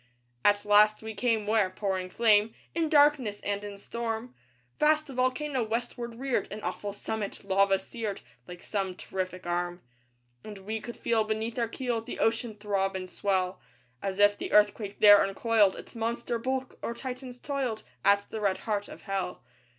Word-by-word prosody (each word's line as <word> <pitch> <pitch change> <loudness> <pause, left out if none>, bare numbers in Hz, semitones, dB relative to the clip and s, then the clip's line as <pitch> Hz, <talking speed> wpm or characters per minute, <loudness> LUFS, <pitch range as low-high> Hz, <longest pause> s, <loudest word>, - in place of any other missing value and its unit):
At 205 0 +3
last 210 +1 +5
we 220 0 -5
came 220 0 +1
where 210 -2 +3
pouring 185 -1 -2
flame 215 +1 +3 0.2
In 325 -1 0
darkness 290 -9 +4
and 200 0 -2
in 205 -1 -7
storm, 230 +3 -4 0.5
Vast 305 0 +3
a - - -8
volcano 255 +2 0
westward 235 +1 -3
reared 260 -3 -1
An 210 - -5
awful 205 - -3
summit, 205 0 -5
lava 195 0 +3
seared, 205 +1 -5 0.3
Like 180 0 -10
some 195 -3 -2
terrific 185 -1 -5
arm. 175 0 -2 0.6
And 210 -1 -8
we 220 +1 -3
could 235 - -8
feel 225 -2 +1
beneath 220 +2 -2
our 230 - +1
keel 240 0 -2
The 225 - -7
ocean 225 0 0
throb 200 -2 -1
and 185 -1 -4
swell, 185 -1 -1 0.4
As 195 -1 -3
if 205 0 +5
the - - -4
Earthquake 210 -1 +3
there 205 -1 +9
uncoiled 205 0 +3
Its - - -11
monster 235 +1 -2
bulk, 260 +2 -3
or 235 - -3
Titans 255 -1 -7
toiled 265 -6 -2 0.2
At 200 0 +4
the 220 - -4
red 195 -2 +1
heart 205 -2 -1
of - - -11
Hell. 195 -3 -3
215 Hz, 170 wpm, -29 LUFS, 200-235 Hz, 0.6 s, there